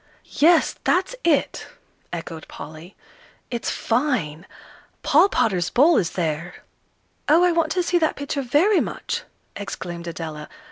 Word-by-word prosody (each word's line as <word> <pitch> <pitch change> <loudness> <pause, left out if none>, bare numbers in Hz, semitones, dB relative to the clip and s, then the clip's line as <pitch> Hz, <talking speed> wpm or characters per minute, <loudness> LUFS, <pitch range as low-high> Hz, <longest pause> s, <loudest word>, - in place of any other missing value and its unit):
"Yes, 330 +2 +3
that's 380 +7 +1
it," 310 -5 +1 0.4
echoed 165 -1 -7
Polly; 160 +5 -10 0.6
"it's 235 -1 -2
fine 225 - -1 0.6
Paul 330 +8 +5
Potter's 180 - +1
'Bull' 290 - +5
is 180 -2 0
there." 170 0 -3 0.7
"Oh, 325 +4 +6
I 360 - +4
want 330 -2 +1
to 360 - +1
see 350 0 +1
that 315 -2 +1
picture 285 0 -3
very 315 - +3
much!" - - -3 0.3
exclaimed 175 -4 -6
Adela. 160 -2 -6
240 Hz, 130 wpm, -23 LUFS, -, 0.7 s, Oh